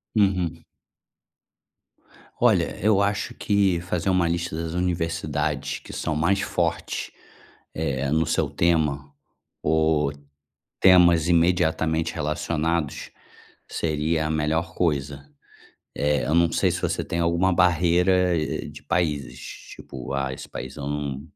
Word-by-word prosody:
Uhum. 95 -6 +1 1.8
Olha, - - +3
eu 105 -1 +4
acho 100 0 -1
que 100 -4 +1
fazer 90 +1 -2
uma 90 -2 +2
lista 85 -1 -2
das 80 0 -4
universidades 80 -5 -1
que - - -12
são 80 - -2
mais 90 +6 +2
fortes, - - -2 0.6
eh, 70 -3 -2
no 80 +1 +3
seu - - 0
tema, 75 -4 0 0.5
ou 80 -2 +2 0.7
temas 90 -3 +6
imediatamente 80 -2 +2
relacionados, 80 0 -2 0.6
seria 80 0 -1
a - - -3
melhor 80 +4 -1
coisa. 70 -4 -1 0.7
Eh, 75 0 +1
eu 75 - 0
não 85 0 +4
sei - - +2
se - - -3
você - - -1
tem 85 - -3
alguma 85 +2 +2
barreira 90 +1 +3 0.3
de - - -12
países, 70 -7 -1 0.4
tipo: 65 0 -8
"Ah, 70 -1 -1
esse - - -9
país 65 +2 -7
eu 70 -2 -5
não". 70 -2 -3
80 Hz, 120 wpm, -24 LUFS, 75-90 Hz, 1.8 s, temas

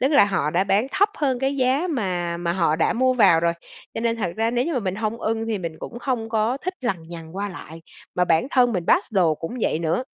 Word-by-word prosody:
tức 270 +4 +2
là 280 -8 +7
họ 190 -7 0
đã 180 +4 +1
bán 200 +4 +2
thấp 405 +2 +3
hơn 265 -4 +1
cái 270 +2 -1
giá 265 +6 +2
mà 180 - -2
mà 170 0 -1
họ 165 -4 +1
đã - - +2
mua 255 +2 +2
vào 190 -8 +5
rồi, 170 0 +2 0.4
cho - - -3
nên 230 0 0
thật 195 -6 -2
ra 225 +1 +1
nếu 245 +1 0
như 335 - -2
mà - - +1
mình 190 -3 -2
hông 220 +2 -3
ưng 225 0 -1
thì 220 -2 -1
mình 165 -3 -6
cũng 240 - -7
hông 245 -4 -2
có 220 +3 0
thích 370 +1 -3
lằng 195 -10 -2
nhằng 165 0 -9
qua 205 +1 -2
lại, 165 -3 -10 0.3
mà 180 - +2
bản 165 +5 +2
thân 245 -2 +3
mình 180 -4 -2
pass 350 - +2
đồ 175 -6 +3
cũng 165 +9 -6
vậy 155 - +1
nữa, 170 +7 0
215 Hz, 265 wpm, -23 LUFS, 170-250 Hz, 0.4 s, là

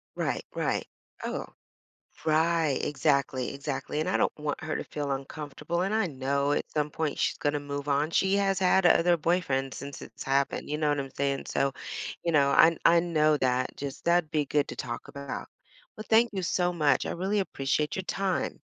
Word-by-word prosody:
Right, - - -1
right. - - -1 0.4
Oh, - - -3 0.8
right, 160 0 +3
exactly, 140 -3 0
exactly, 140 +1 -3
and 160 - -1
I - - +2
don't - - +1
want 150 -1 -3
her 155 - -2
to - - -3
feel 145 -2 -3
uncomfortable, 150 +5 -4
and 195 +3 0
I 220 -4 +2
know 140 0 0
at - - -1
some 150 -1 0
point 155 0 -2
she's - - 0
gonna 145 0 0
move 145 0 -5
on; 145 +2 +1
she 190 +3 +2
has 195 -1 +2
had 190 0 +3
other 175 0 +5
boyfriends 150 -6 0
since 140 0 -7
it's - - -9
happened, 135 +1 0
you 150 - -1
know 155 -1 +1
what 145 0 +1
I'm 135 -1 -3
saying? 140 -1 -1
So, 135 0 0 0.5
you 170 - +1
know, 140 -2 +4
I 165 +4 +6
I 170 +1 +7
know 155 -3 +3
that, 130 -1 0
just 140 -1 -6
that'd 170 -2 +3
be 150 -1 +2
good 145 0 +1
to - - -6
talk 120 -1 -5
about. 140 -1 -6 0.5
Well, 215 - -7
thank 230 +1 +5
you 190 -2 -3
so 180 0 +1
much, 150 -6 +2
I - - -2
really 190 +4 -1
appreciate 150 -5 -1
your 190 - -2
time. 195 0 -1
150 Hz, 195 wpm, -28 LUFS, 140-170 Hz, 0.8 s, I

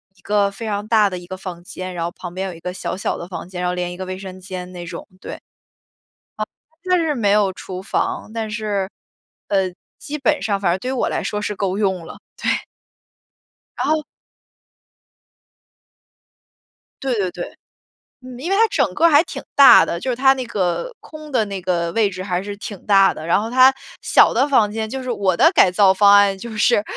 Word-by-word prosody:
一 - - -27
个 205 -1 +1
非 200 +3 -8
常 205 -1 -2
大 215 -2 +3
的 185 - -5
一 175 - -10
个 185 - -6
房 180 -2 -8
间， 185 +1 -7
然 170 - -3
后 170 - -2
旁 175 0 -9
边 190 +1 -3
有 - - -7
一 165 - -12
个 180 +2 -5
小 180 0 -4
小 195 - -2
的 - - -7
房 180 - -7
间， 180 -1 -6
然 180 - 0
后 - - -1
连 180 0 -3
一 - - -8
个 190 - -6
卫 185 0 -5
生 185 -1 -9
间 185 -1 -7
那 175 -1 -7
种， 170 0 -8
对。 - - -7
啊， - - -13 1.4
它 365 0 +2
就 340 - +1
是 305 -2 0
没 215 -6 +1
有 205 -2 +3
厨 185 0 -8
房， 195 - -2
但 220 -1 -3
是， 210 -3 -2 0.6
呃， 190 -2 +1 0.3
基 300 +1 -6
本 295 +2 +1
上 200 -3 -1
反 175 -3 +2
正 180 - -1
对 255 - -3
于 - - -2
我 - - +1
来 - - -2
说 210 - -3
是 210 0 -3
够 195 -1 -2
用 190 -4 0
了， - - -11 0.2
对。 - - -4 1.3
然 - - -1
后 310 -1 +1 3.0
对 270 -2 0
对 195 -4 0
对。 - - -8 0.7
嗯， 250 -1 -9
因 315 +7 -4
为 390 - +2
它 450 +3 +5
整 260 - +1
个 335 +1 +5
还 295 -1 +6
挺 - - -7
大 280 -2 +9
的， 170 - -3
就 260 - -4
是 250 - 0
它 265 +2 +5
那 260 -2 -5
个 200 - -2
空 310 -1 -11
的 245 -5 +2
那 200 -2 -5
个 170 -2 -1
位 215 +1 +2
置 185 -1 -7
还 180 -2 -1
是 205 +1 -6
挺 205 -2 -8
大 195 -2 +5
的， 155 - -8
然 170 - +3
后 225 +2 -5
它 260 +1 +6 0.3
小 - - +5
的 260 +5 +2
房 225 -7 +3
间 220 0 -3
就 265 +2 -5
是 255 - -3
我 195 -5 +1
的 325 - +5
改 370 - +5
造 190 +1 +4
方 200 +1 +6
案， 200 -1 +5
就 235 +5 -8
是 210 - +3
200 Hz, 240 characters per minute, -20 LUFS, 185-235 Hz, 3.0 s, 大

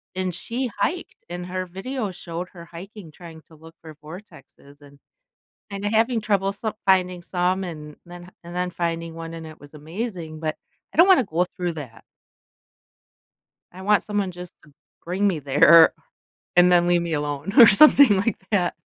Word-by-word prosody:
and 185 -1 -2
she 235 +8 -4
hiked, 360 +1 -2
and 175 0 -6
her 185 0 -4
video 200 +4 -5
showed 175 0 -7
her 170 -2 -11
hiking, 175 0 -12
trying 165 -1 -13
to 160 - -18
look 160 +1 -16
for 160 -2 -12
vortexes, 155 -4 -14
and 140 -1 -18 0.7
and 200 +1 -6
having 225 +3 +1
trouble 200 -2 0
so 210 +2 -5
finding 185 -2 +2
some, 180 +2 -1
and 150 -4 -8
then 175 0 -12
and 170 +1 -10
then 180 0 -1
finding 165 -1 -4
one, 165 0 -8
and 165 -1 -8
it 155 - -13
was 145 +1 -16
amazing. 160 0 -7
But 155 -1 -3 0.4
I - - -13
don't 345 - +7
wanna 370 -9 +5
go 175 -2 -1
through 175 -2 -2
that. 125 -8 -10 1.7
I 185 - -11
want 210 +2 +2
someone 205 -2 -2
just 180 -1 -10
to 150 - -21 0.3
bring 185 +4 -1
me 185 -5 0
there 150 +4 +6 0.6
and 180 0 +6
then 175 0 +4
leave 175 -1 +2
me 170 -1 -4
alone 145 +4 -4
or 235 - +11
something 265 0 +7
like 200 +2 -1
that. 185 -5 0
175 Hz, 175 wpm, -23 LUFS, 165-195 Hz, 1.7 s, or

